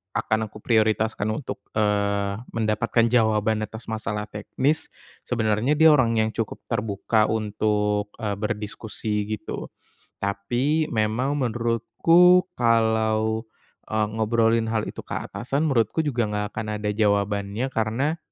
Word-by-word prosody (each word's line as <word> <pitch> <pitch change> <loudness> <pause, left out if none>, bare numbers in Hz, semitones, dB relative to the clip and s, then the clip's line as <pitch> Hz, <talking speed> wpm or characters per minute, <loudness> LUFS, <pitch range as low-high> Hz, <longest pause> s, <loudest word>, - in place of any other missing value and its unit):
akan 110 +1 0
aku 105 0 -14
prioritaskan 110 -2 +1
untuk, 110 +5 -4 0.2
eee, 100 -1 +1 0.2
mendapatkan 115 +1 +1
jawaban 110 -2 +2
atas 110 +2 -9
masalah 110 -1 -3
teknis 130 +8 -1 0.4
sebenarnya 115 +4 +1
dia 160 +1 +7
orang 125 -6 +3
yang 110 0 +2
cukup 110 -1 -4
terbuka 110 0 +1
untuk, 105 -1 0
eee, 105 -2 -1
berdiskusi 105 -1 -3
gitu, 110 0 -5 0.5
tapi 120 +11 0
memang 115 +6 0
menurutku 130 +9 +4 0.2
kalau, 110 -1 +2 0.4
eee, 110 0 0
ngobrolin 115 +1 +2
hal 110 -1 0
itu - - -18
ke - - -5
atasan 135 +5 -3
menurutku 135 0 +1
juga 125 -7 0
nggak 105 0 -2
akan 110 0 -4 0.2
ada 105 - 0
jawabannya, 100 +2 0
karena 125 +8 -1
110 Hz, 120 wpm, -24 LUFS, 105-120 Hz, 0.5 s, dia